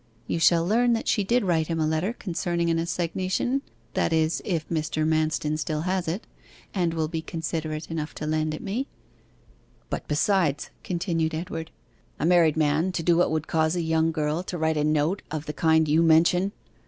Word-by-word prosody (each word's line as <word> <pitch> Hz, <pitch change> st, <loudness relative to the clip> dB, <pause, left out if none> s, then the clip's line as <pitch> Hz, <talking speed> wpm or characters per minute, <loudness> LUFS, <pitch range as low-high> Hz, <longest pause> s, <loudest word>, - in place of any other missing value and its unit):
You -, -, -2 dB
shall 165 Hz, 0 st, +4 dB
learn 235 Hz, +5 st, +3 dB
that 225 Hz, -, -2 dB
she 205 Hz, -, +2 dB
did 235 Hz, +5 st, +2 dB
write 165 Hz, -4 st, +1 dB
him 165 Hz, -1 st, -2 dB
a 155 Hz, -, +2 dB
letter 160 Hz, +6 st, 0 dB
concerning 170 Hz, -5 st, -1 dB
an 165 Hz, -, +1 dB
assignation 185 Hz, +9 st, -1 dB, 0.3 s
that -, -, +1 dB
is, 160 Hz, 0 st, +1 dB
if 165 Hz, -5 st, -2 dB
Mr. 155 Hz, -1 st, -1 dB
Manston 155 Hz, -1 st, 0 dB
still 155 Hz, 0 st, -2 dB
has 185 Hz, +1 st, -1 dB
it, 175 Hz, +7 st, -3 dB, 0.5 s
and 175 Hz, -4 st, 0 dB
will 160 Hz, -1 st, 0 dB
be 160 Hz, 0 st, -3 dB
considerate 160 Hz, -1 st, -4 dB
enough 155 Hz, -1 st, -4 dB
to 150 Hz, -, -5 dB
lend 155 Hz, 0 st, 0 dB
it -, -, -9 dB
me.' 235 Hz, +8 st, -2 dB, 1.0 s
'But -, -, -4 dB
besides,' 150 Hz, -1 st, +1 dB
continued 170 Hz, -3 st, -1 dB
Edward, 160 Hz, -1 st, -5 dB, 0.5 s
'a -, -, 0 dB
married 165 Hz, -3 st, +4 dB
man 155 Hz, +4 st, +2 dB
to 165 Hz, -, -2 dB
do 170 Hz, +1 st, +4 dB
what 175 Hz, -, +3 dB
would 155 Hz, -1 st, -1 dB
cause 160 Hz, +1 st, +1 dB
a 175 Hz, -, 0 dB
young 160 Hz, 0 st, +2 dB
girl 155 Hz, +1 st, -1 dB
to 180 Hz, -1 st, -5 dB
write 160 Hz, -1 st, +1 dB
a 150 Hz, -, +1 dB
note 155 Hz, +5 st, +1 dB
of 155 Hz, 0 st, -4 dB
the 150 Hz, -, -4 dB
kind 160 Hz, -1 st, +3 dB
you 155 Hz, +2 st, +4 dB
mention! 170 Hz, +4 st, +4 dB
165 Hz, 190 wpm, -26 LUFS, 155-175 Hz, 1.0 s, shall